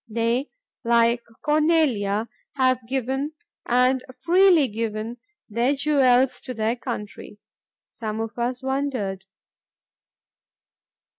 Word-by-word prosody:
They, 230 +5 0 0.3
like 235 0 +3 0.2
Cornelia, 295 -10 +2 0.3
have 255 -2 +2
given, 265 +3 -2 0.3
and 250 +1 +3
freely 345 0 +4
given, 220 +1 -4 0.3
their 235 +6 +1
jewels 265 -3 +3
to 255 - -6
their 220 +2 0
country." 210 -4 -7 0.5
Some 220 -3 -5
of 225 +1 -5
us 250 +2 -2
wondered. 260 -9 -2
250 Hz, 90 wpm, -24 LUFS, 225-270 Hz, 0.5 s, freely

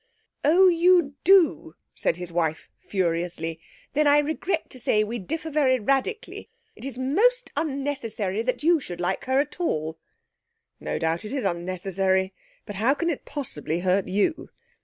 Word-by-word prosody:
'Oh, 350 +6 +6
you 345 -4 +4
do,' 345 - +4 0.2
said 165 - -1
his 180 -1 -6
wife 160 -2 -2
furiously; 170 -3 -2 0.3
'then 300 +1 +3
I 290 0 +6
regret 315 +3 -1
to 255 - -7
say 215 -2 +2
we 230 +3 -4
differ 320 - -4
very 270 -4 +3
radically. 275 - -2 0.3
It - - -12
is 270 -3 -4
most 430 - +2
unnecessary 270 - -2
that 255 +4 -2
you 335 +1 +4
should 175 -10 -8
like 175 - -2
her 260 +1 +2
at 295 - -2
all.' 160 - -2 0.8
'No - - -3
doubt 165 +1 -1
it 215 - -5
is 270 -6 -2
unnecessary, 190 +1 0 0.3
but 205 - -7
how 240 +7 +2
can 335 +2 0
it 290 - -6
possibly 170 - -3
hurt 185 +1 +1
you? 205 - 0
250 Hz, 160 wpm, -25 LUFS, 185-300 Hz, 0.8 s, Oh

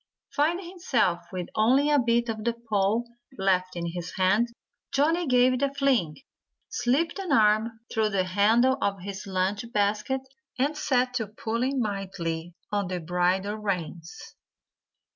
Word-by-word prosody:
Finding 340 +5 +1
himself 245 - 0
with 180 -2 -4
only 265 +7 +3
a 290 - +5
bit 235 -1 +2
of 220 -1 -3
the 235 +1 +1
pole 225 0 0 0.3
left 185 -1 +1
in 170 -1 -3
his 175 +1 -5
hand, 195 +5 +3 0.4
Johnnie 325 +4 +2
gave 250 0 +4
it 255 - -2
a 280 -1 +2
fling, 265 - +1 0.5
slipped 325 - 0
an 375 -5 -4
arm 220 -1 +3
through 220 -2 +2
the 195 -2 +1
handle 220 +8 +3
of 195 -2 -1
his 195 +1 -6
lunch 190 +2 0
basket, 210 +5 0 0.4
and 285 +4 +1
set 255 -4 +1
to 225 -4 -1
pulling 235 +5 -2
mightily 175 -5 -3 0.2
on 205 -2 0
the 180 0 -3
bridle 180 +4 0
reins. 180 -5 -5
215 Hz, 145 wpm, -27 LUFS, 190-255 Hz, 0.5 s, a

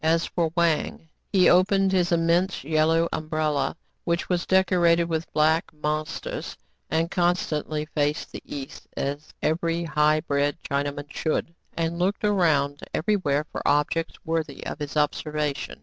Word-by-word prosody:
As 165 +1 +3
for 170 -2 0
Wang, 165 -1 0 0.2
he 185 -2 +5
opened 195 +1 +4
his 180 -1 +2
immense 170 +2 +2
yellow 160 +2 +2
umbrella, 155 -2 -1 0.3
which 170 0 -1
was 175 -1 0
decorated 175 -3 +4
with 165 -1 -3
black 155 +2 +2
mon 155 0 -1
sters, - - -6 0.3
and 165 +1 0
constantly 160 -4 0
faced 150 -1 -1
the - - -7
east 135 -2 -8
as 145 +2 -3
every 165 +2 0
high 150 0 +2
bred 145 -2 0
Chinaman 145 +1 -3
should, 165 +1 -1 0.2
and 165 +1 -1
looked 190 +4 0
around 150 -8 +2 0.2
every 210 +6 +1
where 150 -6 0
for - - -4
objects 150 +3 +1
worthy 160 -4 -2
of - - -5
his 145 0 -4
observation. 150 -1 -1
160 Hz, 145 wpm, -25 LUFS, 150-170 Hz, 0.3 s, he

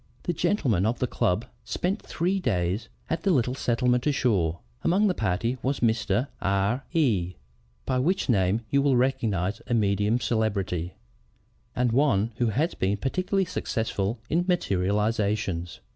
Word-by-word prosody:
The 175 - -1
gentlemen 135 - +1
of 115 - 0
the - - 0
club 105 -2 0 0.2
spent 185 - -2
three 185 +4 -1
days 105 - -1 0.2
at 165 0 -2
the 195 - +1
little 125 -7 +2
settlement 125 0 +1
ashore. 100 - +1 0.3
Among 195 +5 +3
the 195 - +3
party 115 - -1
was 135 +1 -1
Mr. 115 +1 +1
R 100 +6 +1
E, 110 - +1 0.5
by 130 - 0
which 180 +9 +1
name 100 -2 +2
you 140 - +4
will 140 -3 +3
recognize 115 -7 0
a 120 - +1
medium 105 0 +2
of 120 - -1
celebrity, 100 -7 -1 0.8
and 125 -1 +1
one 115 -5 +2
who 120 - +1
has 145 - 0
been 95 +2 0
particularly 185 - 0
successful 110 - -2
in 170 +5 +1
materializations. 105 - 0
115 Hz, 145 wpm, -26 LUFS, 100-135 Hz, 0.8 s, you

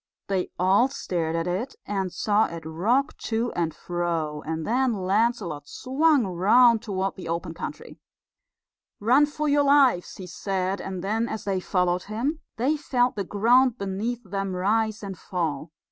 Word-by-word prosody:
They 190 -2 0
all 190 +7 +4
stared 170 -11 -3
at 165 0 -1
it, 195 +10 -3
and 195 -2 -2
saw 210 +4 +2
it 165 -1 -8
rock 225 - 0
to 230 +1 -1
and 165 -2 -1
fro; 165 -3 -3
and 160 0 -3
then 250 +2 +1
Lancelot 190 -6 0
swung 280 0 +2
round 215 +6 +4
toward 195 -2 -2
the 185 - -7
open 170 0 -3
country. 300 - -8 1.0
"Run 255 +8 +4
for 300 +1 -3
your 290 0 +4
lives," 275 -10 +4
he 185 - -8
said, 190 +2 -2
and 185 -2 -5
then, 225 +4 0
as 220 - -4
they 195 -2 -1
followed 180 -1 0
him, 245 +10 -2 0.2
they 270 +7 +1
felt 250 -4 +1
the 200 - -2
ground 240 +6 +3
beneath 210 +5 -3
them 195 -1 -3
rise 215 +3 0
and 195 -3 -6
fall. 160 -4 -3
200 Hz, 160 wpm, -25 LUFS, 180-245 Hz, 1.0 s, all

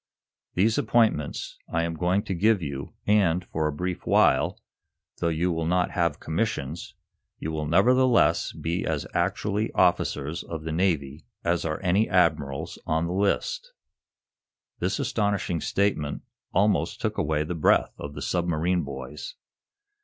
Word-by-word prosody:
These 110 +8 +3
appointments 110 - +1
I 85 0 +1
am 85 0 -2
going 90 +4 +1
to 95 - -3
give 100 +1 +2 0.4
and, 95 -4 +3
for 80 -2 -1
a - - -1
brief 90 +4 -4
while, - - +3 0.6
though - - +1
you 85 +3 0
will 80 -1 -1
not 90 +1 +1
have 85 -4 0
commissions, 80 -4 -3 0.4
you 80 - -4
will 75 -1 -3
nevertheless 125 - +4
be 85 +2 -3
as - - -2
actually 105 +2 0
officers 75 +4 +1
of 80 -2 -6
the 80 - -4
Navy 80 -4 -1 0.2
as 85 0 0
are 75 -1 -2
any 95 +4 +2
admirals 80 -7 +1
on 80 +1 +1
the 85 - -2
list." - - -1 1.1
This - - 0
astonishing 100 -6 -1
statement 95 -8 0 0.3
almost 105 +1 +1
took - - -2
away 75 0 +1
the 80 - -4
breath 80 - +3
of 75 0 -7
the 75 - -5
submarine 85 0 0
boys. 70 0 -7
85 Hz, 140 wpm, -26 LUFS, 80-100 Hz, 1.1 s, nevertheless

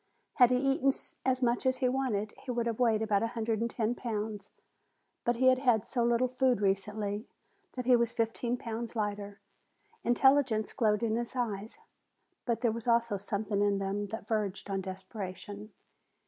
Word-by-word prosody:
Had 245 -3 +7
he 250 - +3
eaten 275 +1 +2 0.3
as 260 0 +1
much 240 0 +2
as 260 -1 +2
he 255 -1 +1
wanted, 250 -5 -1
he - - -12
would 240 -1 0
have 230 -1 -2
weighed 225 -3 +3
about 205 -2 +2
a 230 - +1
hundred 225 -1 0
and 235 - 0
ten 230 0 0
pounds, 215 -4 -4 0.7
but 240 - +1
he 255 +3 +1
had 255 0 +4
had 245 -6 +3
so 240 -3 0
little 240 +2 +3
food 255 -2 +2
recently 205 +2 -1 0.5
that 250 -1 -4
he 250 0 +6
was 235 -1 +2
fifteen 235 +2 -1
pounds 230 0 -5
lighter. 205 -2 -3 0.6
Intelligence 250 -3 +3
glowed 215 -3 +2
in 225 -1 +1
his 240 +2 -4
eyes. 220 -4 -3 0.7
But 235 -2 -1
there 235 - +3
was 230 +1 -6
also 235 -3 +3
something 205 0 -2
in 205 -1 +3
them 195 +1 -2
that 220 +1 -6
verged 205 -3 -2
on 195 0 -1
desperation. 195 +2 -7
225 Hz, 175 wpm, -31 LUFS, 205-245 Hz, 0.7 s, Had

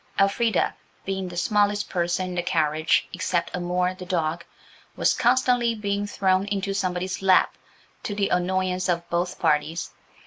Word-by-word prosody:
Elfrida, 200 +1 +2 0.3
being 190 -1 -2
the 175 -1 -8
smallest 205 +2 +1
person 175 +1 -1
in - - -5
the 175 - 0
carriage 155 -1 +1
except 180 -1 -1
Amour, 180 +1 0
the 185 0 -10
dog, 170 -2 -1 0.5
was - - +2
constantly 245 -1 +2
being 205 -1 -2
thrown 190 -1 +1
into 200 -1 -2
somebody's 185 -1 -2
lap–to 195 +2 0
the 200 -1 0
annoyance 185 0 0
of 170 -1 0
both 175 +1 -1
parties. 160 +1 0
185 Hz, 140 wpm, -25 LUFS, 175-200 Hz, 0.5 s, Elfrida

